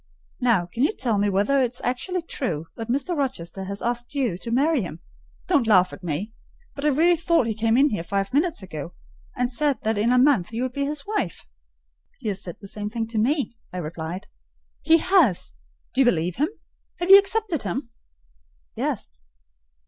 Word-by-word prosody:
Now, 230 -8 +3
can 180 +8 -5
you 300 +10 +3
tell 230 - 0
me 205 0 +2
whether 205 +8 +2
it 245 -1 0
is 245 - -6
actually 335 +9 -2
true 170 - -3
that 225 -1 -6
Mr. 280 +8 0
Rochester 195 - -3
has 200 +1 -5
asked 240 +3 -2
you 255 -10 0
to 235 - -6
marry 280 +4 +2
him? 170 -4 -6 0.5
Don't 255 -6 +2
laugh 185 -4 +5
at 195 - -11
me. 175 +7 -3 0.4
But 280 - -5
I - - +5
really 325 +5 +4
thought 335 -4 +2
he 225 - -1
came 225 +2 +1
in 285 +3 +5
here 205 - -1
five 195 +4 -2
minutes 305 - +1
ago, 165 -2 -7 0.4
and 250 - +1
said 280 +3 +1
that 220 -1 0
in 230 +3 +2
a 250 - +4
month 250 -9 +3
you 235 +3 -1
would 255 -1 -3
be 280 +1 -1
his 290 0 -3
wife." 410 - -3 0.7
"He 230 -5 -4
has 195 -1 -3
said 175 -5 -7
the 200 - -10
same 210 +1 -4
thing 225 0 -2
to 225 -1 -1
me," 270 +2 0 0.2
I 180 - -6
replied. 165 +2 -5 0.6
"He 325 +2 +5
has! 310 - +2 0.4
Do 265 - +3
you - - +5
believe 175 -6 +1
him? 300 +5 +1 0.5
Have 350 +2 +1
you 395 - +12
accepted 400 -5 0
him?" 235 +7 -3 0.9
"Yes." - - -4
240 Hz, 200 wpm, -24 LUFS, 195-285 Hz, 0.9 s, you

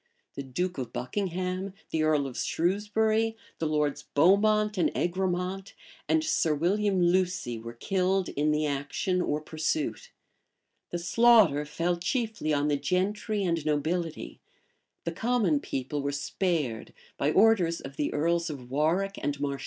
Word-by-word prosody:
The - - -5
duke 145 +5 -3
of 125 - -4
Buckingham, 185 +5 -3 0.2
the 160 - 0
earl 155 -2 +2
of 130 -3 -6
Shrewsbury, 215 +5 0 0.2
the 160 - 0
Lords 150 -1 0
Beaumont 210 +6 +4
and 180 - +2
Egremont, 185 +2 -2 0.3
and 320 -1 +3
Sir 165 - +1
William 195 +5 +1
Lucie 175 -9 +1
were 115 +1 -8
killed 190 - 0
in 150 +2 0
the 150 0 +1
action 145 +6 -1
or 150 -3 0
pursuit: 305 - -2 0.8
the 175 - -3
slaughter 190 -5 +4
fell 170 +3 -1
chiefly 210 - -2
on 145 0 +1
the 145 -1 +2
gentry 200 +7 -1
and 170 -4 0
nobility; 155 +2 -2 0.6
the 170 - -2
common 205 -5 +1
people 140 +1 -3
were 140 0 -1
spared 145 - -2 0.2
by 145 - +1
orders 190 -4 +4
of 135 0 -9
the 150 - -1
earls 170 +3 0
of 130 -4 -8
Warwick 170 +8 0
and 145 -1 -2
Marche. 140 -1 -2
170 Hz, 145 wpm, -28 LUFS, 145-195 Hz, 0.8 s, Beaumont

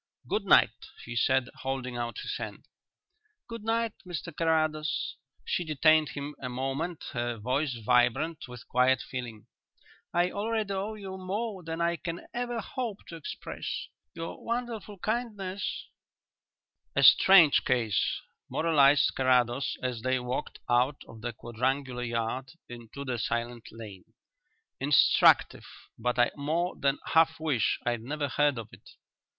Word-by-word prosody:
"Good - - -1
night," - - +4 0.2
he 120 - -6
said, 130 +2 +2
holding 130 -2 -3
out 120 -1 -3
his - - -3
hand. - - -7 0.8
"Good 230 -2 -7
night, 230 0 0
Mr 175 -4 -6
Carrados." 155 -1 0 0.3
She 180 - 0
detained 155 0 +4
him 145 +1 -5
a 125 - -4
moment, 135 +7 -3
her 120 -1 -2
voice 130 +5 -1
vibrant 125 +6 +1
with 125 -1 -11
quiet 125 0 +3
feeling. 120 -5 -7 0.7
"I 175 +1 +2
already 215 -1 -1
owe 200 +3 -3
you 190 -2 -7
more 200 +2 -3
than 165 0 -4
I 170 0 +1
can 170 0 -6
ever 240 -1 -2
hope 230 -5 -5
to 170 - -7
express. 160 - -6 0.3
Your 165 - -6
wonderful 230 -3 -4
kindness 205 -2 -3 0.6
" - - -53
"A - - +3
strange 175 -7 +8
case," 120 -5 +1 0.3
moralized 150 -3 +4
Carrados, 130 0 +2
as 125 -3 -2
they 130 +1 +1
walked 125 +1 -4
out 125 +4 +2
of 110 -1 -12
the 120 +1 -3
quadrangular 125 +3 -2
yard 120 +3 -2
into 120 +3 -9
the 125 -3 -2
silent 120 +1 -3
lane. 105 -5 -10 0.7
"Instructive, 140 +1 +4 0.3
but 125 +2 -1
I 120 0 +4
more 160 +5 -1
than 140 0 +1 0.2
half 160 0 +4
wish 145 -9 +1
I'd 120 -2 0
never 145 +4 -3
heard 145 +1 +2
of 110 -2 -6
it." - - -15
140 Hz, 140 wpm, -29 LUFS, 125-175 Hz, 0.8 s, strange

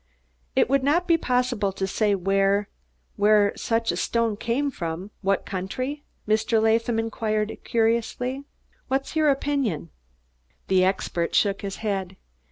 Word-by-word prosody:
"It - - +4
would 275 +1 +2
not 310 +7 +2
be 335 - +5
possible 250 -8 0
to 195 - -2
say 205 +1 +1
where 195 +2 +1 0.5
where 205 0 +4
such 230 0 0
a - - -3
stone 230 -2 0
came 250 +7 -1
from 175 -1 -5
what 195 -1 0
country?" 255 +10 -4 0.2
Mr. 220 +1 +2
Latham 225 +1 +2
inquired 220 -1 -1
curiously. 235 +4 0 0.4
"What's 270 +3 -2
your 310 -1 +4
opinion?" 270 - -1 0.8
The 185 -1 +4
expert 185 -2 0
shook 200 -2 +2
his 195 -1 -4
head. 190 -2 -2
220 Hz, 135 wpm, -25 LUFS, 195-250 Hz, 0.8 s, be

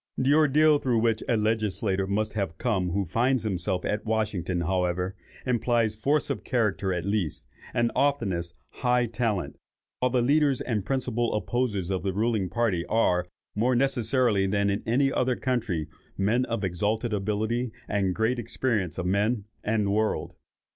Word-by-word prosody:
The 135 +2 +3
ordeal 150 0 +5
through 125 -4 +1
which 110 -1 +2
a 115 - +3
legislator 105 -3 0
must 105 +2 -1
have 100 -6 -2
come 95 -6 0
who 95 +2 0
finds 120 +7 +1
himself 95 -2 -1
at 105 0 -1
Washington, 105 -5 -1
however, 90 +1 -1 0.3
implies 120 -3 +1
force 140 +7 +1
of - - -4
character 105 -6 0
at 90 -1 -2
least, 100 -6 -1 0.2
and 120 0 +1
oftenest, 95 -12 0 0.2
high 125 -1 +1
talent; 115 -4 -2 0.4
while 125 - +2
the 125 -1 +2
leaders 145 0 +3
and 110 -5 -2
principal 120 -3 -1
opposers 105 -5 -1
of 95 - -1
the 95 -1 -2
ruling 105 -2 0
party, 105 -6 0
are, 90 -5 +2 0.3
more 120 +4 +2
necessarily 120 -5 +2
than 100 +1 +1
in 100 - -1
any 135 +4 +2
other 125 0 +1
country, 110 - -1 0.3
men 110 +6 +2
of 115 -4 -3
exalted 105 +5 -1
abilities 110 +4 -1 0.2
and 95 -3 0
great 115 +3 +1
experience 110 - -1
of 90 - -2
men 100 +3 +1 0.2
and 105 -1 +1
the 100 - 0
world. 110 +1 0
110 Hz, 160 wpm, -27 LUFS, 95-120 Hz, 0.4 s, ordeal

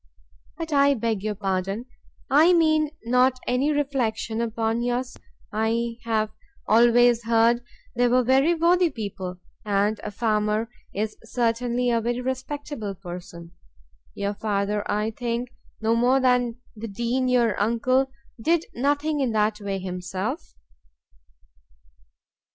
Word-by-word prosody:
But 325 -2 -4
I 280 0 +5
beg 225 -4 -1
your 210 0 -2
pardon; 195 +3 -2 0.4
I 315 +6 +5
mean 310 -3 +3 0.2
not 250 +2 +3
any 260 +4 +1
reflection 245 -6 -1
upon 225 0 -1
yours: 245 +1 -2 0.4
I 230 +2 -1
have 215 -2 0 0.4
always 240 +1 +5
heard 230 +1 +3 0.3
they 245 +1 +3
were 250 +1 +3
very 270 +7 +3
worthy 345 +1 +3
people. 195 - -6 0.3
And 205 +1 +1
a - - -3
farmer 215 +1 0 0.2
is 215 +2 -3
certainly 240 +1 0
a 230 -1 +2
very 240 +2 -1
respectable 260 -4 -4
person. 175 -2 -9 0.6
Your 200 0 -2
father, 205 -1 -1
I 210 +2 0
think, 240 +1 -3 0.3
no 225 +1 +2
more 250 +3 +3
than 250 -2 +2 0.2
the 225 +1 -6
Dean 235 +5 -1
your 240 -4 +3
uncle, 255 +5 +2 0.3
did 330 +4 +2
nothing 290 +4 0
in 255 -5 0
that 210 0 +1
way 200 -1 -2
himself?" 185 0 -5
235 Hz, 125 wpm, -25 LUFS, 210-255 Hz, 0.6 s, I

